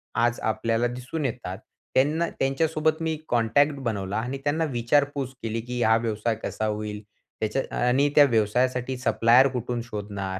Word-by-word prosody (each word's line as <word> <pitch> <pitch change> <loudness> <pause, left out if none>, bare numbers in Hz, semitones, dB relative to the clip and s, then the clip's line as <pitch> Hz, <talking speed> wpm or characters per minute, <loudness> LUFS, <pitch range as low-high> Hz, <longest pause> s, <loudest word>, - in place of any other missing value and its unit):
आज 120 0 +1
आपल्याला 115 +2 0
दिसून 125 +5 -5
येतात. 115 -7 -4 0.4
त्यांना, 155 +6 +2
त्यांच्यासोबत 155 +3 0
मी 160 -1 0
कॉन्टॅक्ट 120 +5 +3
बनवला 100 -2 -2
आणि 125 +4 -3
त्यांना 155 +3 +1
विचारपूस 135 +2 0
केली, 115 0 -2
की 125 +1 -4
हा 110 0 +5
व्यवसाय 115 0 -1
कसा 110 - -2
होईल? 105 0 -3 0.4
त्याच्या 110 +5 -1 0.2
आणि 140 +4 +3
त्या 145 - +9
व्यवसायासाठी 125 +2 +1
सप्लायर 125 +1 +4
कुठून 120 0 -3
शोधणार? 100 -4 -5
120 Hz, 145 wpm, -25 LUFS, 110-135 Hz, 0.4 s, त्या